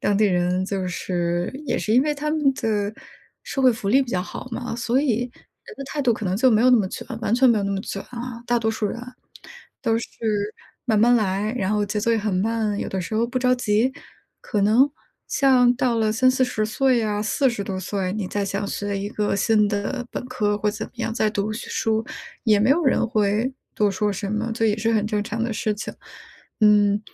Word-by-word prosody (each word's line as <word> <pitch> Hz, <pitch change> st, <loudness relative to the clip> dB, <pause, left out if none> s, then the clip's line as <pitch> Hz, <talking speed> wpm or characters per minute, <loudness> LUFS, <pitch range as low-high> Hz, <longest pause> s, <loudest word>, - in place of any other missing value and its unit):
当 205 Hz, -, +1 dB
地 215 Hz, -, +3 dB
人 180 Hz, 0 st, +1 dB
就 190 Hz, -1 st, -2 dB
是 175 Hz, -1 st, -2 dB
也 245 Hz, -, 0 dB
是 215 Hz, -, -1 dB
因 250 Hz, -, +6 dB
为 300 Hz, 0 st, 0 dB
他 300 Hz, +1 st, -3 dB
们 295 Hz, -3 st, +2 dB
的 210 Hz, -3 st, -1 dB, 0.5 s
社 270 Hz, -, -4 dB
会 255 Hz, -2 st, +6 dB
福 215 Hz, -3 st, -4 dB
利 260 Hz, +7 st, +5 dB
比 260 Hz, -, -8 dB
较 180 Hz, -1 st, 0 dB
好 255 Hz, -, -8 dB
嘛， 245 Hz, 0 st, -4 dB
所 240 Hz, +2 st, +1 dB
以 250 Hz, -6 st, +1 dB
人 425 Hz, -, -12 dB
的 -, -, -6 dB
态 295 Hz, -, -3 dB
度 245 Hz, -3 st, +3 dB
可 215 Hz, -, -6 dB
能 185 Hz, +1 st, 0 dB
就 260 Hz, +4 st, +4 dB
没 220 Hz, 0 st, +4 dB
有 255 Hz, -, +6 dB
那 250 Hz, -, +7 dB
么 205 Hz, -4 st, +1 dB
卷， -, -, -7 dB, 0.2 s
完 230 Hz, 0 st, +1 dB
全 255 Hz, 0 st, +5 dB
没 225 Hz, -, +3 dB
有 200 Hz, -, -1 dB
那 200 Hz, -, -1 dB
么 195 Hz, -, -2 dB
卷 195 Hz, -, -5 dB
啊。 240 Hz, -1 st, -6 dB
大 240 Hz, -, +2 dB
多 220 Hz, -1 st, 0 dB
数 220 Hz, -1 st, -2 dB
人 230 Hz, -, -4 dB, 0.8 s
都 230 Hz, -3 st, +2 dB
是 -, -, -5 dB, 0.8 s
慢 220 Hz, -4 st, +2 dB
慢 240 Hz, +2 st, +5 dB
来， 210 Hz, +1 st, 0 dB
然 195 Hz, -1 st, 0 dB
后 210 Hz, -1 st, +1 dB
节 210 Hz, +1 st, -2 dB
奏 230 Hz, +3 st, +1 dB
也 225 Hz, -, +2 dB
很 210 Hz, -2 st, -1 dB
慢， 215 Hz, +1 st, 0 dB
有 -, -, -2 dB
的 190 Hz, -, -2 dB
时 185 Hz, +5 st, -5 dB
候 225 Hz, +2 st, +2 dB
不 250 Hz, +2 st, -2 dB
着 255 Hz, 0 st, +3 dB
急， 235 Hz, +1 st, +1 dB, 0.5 s
可 210 Hz, -, -2 dB
能 235 Hz, +7 st, +4 dB, 0.4 s
像 255 Hz, -3 st, +4 dB
到 245 Hz, -2 st, +1 dB
了 215 Hz, -1 st, +2 dB
30-40 255 Hz, -2 st, +2 dB
岁 255 Hz, +2 st, +2 dB
呀， 210 Hz, -2 st, -1 dB
40 225 Hz, 0 st, +1 dB
多 190 Hz, -1 st, -4 dB
岁， 190 Hz, 0 st, -2 dB
你 210 Hz, -3 st, -3 dB
再 205 Hz, -, -2 dB
想 200 Hz, +1 st, -2 dB
学 205 Hz, 0 st, -3 dB
一 200 Hz, -, -3 dB
个 205 Hz, -1 st, -1 dB
新 210 Hz, 0 st, +3 dB
的 215 Hz, +5 st, -2 dB
本 -, -, -5 dB
科 210 Hz, -5 st, 0 dB
或 210 Hz, 0 st, +1 dB
怎 215 Hz, +1 st, -5 dB
么 -, -, -20 dB
样 225 Hz, -1 st, -2 dB
再 220 Hz, -2 st, +2 dB
读 210 Hz, 0 st, -2 dB
学 215 Hz, -, -6 dB
书， 220 Hz, 0 st, 0 dB, 0.4 s
也 215 Hz, -3 st, +4 dB
没 220 Hz, -, +3 dB
有 325 Hz, +5 st, +3 dB
人 260 Hz, -, +3 dB
会 215 Hz, +3 st, +1 dB, 0.2 s
多 210 Hz, -1 st, +2 dB
说 205 Hz, +2 st, 0 dB
什 195 Hz, +1 st, -4 dB
么， 220 Hz, +2 st, -1 dB
就 225 Hz, 0 st, -1 dB
也 210 Hz, -1 st, +2 dB
是 225 Hz, +1 st, +1 dB
很 215 Hz, -1 st, +1 dB
正 210 Hz, -1 st, -1 dB
常 225 Hz, +2 st, -3 dB
的 230 Hz, 0 st, -1 dB
事 215 Hz, 0 st, -1 dB
情。 210 Hz, -, -6 dB, 0.7 s
嗯， 205 Hz, -1 st, +5 dB
215 Hz, 245 characters per minute, -23 LUFS, 205-245 Hz, 0.8 s, 那